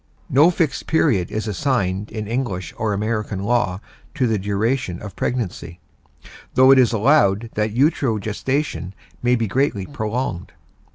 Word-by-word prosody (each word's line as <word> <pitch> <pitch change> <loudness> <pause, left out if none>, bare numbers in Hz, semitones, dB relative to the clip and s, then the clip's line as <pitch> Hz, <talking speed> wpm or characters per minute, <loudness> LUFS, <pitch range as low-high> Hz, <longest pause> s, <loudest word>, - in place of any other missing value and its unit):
No 145 +6 +6
fixed 165 -4 -1
period 120 - +2
is 110 +1 -3
assigned 105 -4 -1
in 110 -1 -4
English 115 -6 -3
or 110 -1 -1
American 105 -1 -2
law 105 -4 +1 0.4
to 135 -5 +1
the 110 -3 +1
duration 100 -1 -1
of 105 -3 -9
pregnancy, 90 -8 -3 0.8
though 130 +1 +7
it 135 - +7
is 125 - +4
allowed 115 -2 +3
that 105 0 -1
utero 130 -3 +2
gestation 105 - -3 0.3
may 125 0 +3
be 115 -2 0
greatly 105 -3 0
prolonged. 110 -7 -4
110 Hz, 145 wpm, -21 LUFS, 100-130 Hz, 0.8 s, though